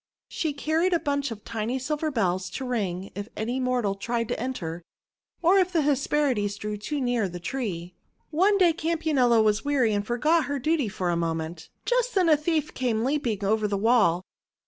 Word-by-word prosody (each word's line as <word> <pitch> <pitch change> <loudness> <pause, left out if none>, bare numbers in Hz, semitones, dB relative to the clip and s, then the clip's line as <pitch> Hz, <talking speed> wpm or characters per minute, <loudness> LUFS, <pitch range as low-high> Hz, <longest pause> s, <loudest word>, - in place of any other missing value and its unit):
She 315 - -1
carried 320 +5 +1
a 340 - +3
bunch 280 -2 -1
of 215 -3 -8
tiny 230 +2 -2
silver 300 +4 -2
bells 185 -8 0
to 265 - -4
ring 195 -6 -2
if 205 +2 -6
any 240 +4 -2
mortal 250 -5 0
tried 230 +3 -2
to - - -2
enter, 175 -10 -4 0.6
or 370 +4 +5
if 370 -1 +2
the 335 -3 +2
Hesperides 275 -7 +1
drew 210 0 -4
too 285 +8 -4
near 245 -6 0
the 175 0 -7
tree. 180 -5 -4 0.4
One 385 +6 +3
day 355 -4 +5
Campanula 310 -8 +2
was 215 0 +2
weary 265 -6 +2
and 205 0 0
forgot 300 +9 +2
her 285 0 -2
duty 295 -1 +1
for 180 -2 -2
a - - +1
moment. 165 0 -3 0.2
Just - - +1
then 365 -3 +4
a 310 - +7
thief 305 0 -1
came 235 -4 0
leap 280 +1 0
ing 205 -3 -1
over 215 +1 +2
the 200 -1 -1
wall. 200 -5 +3
245 Hz, 190 wpm, -26 LUFS, 205-300 Hz, 0.6 s, a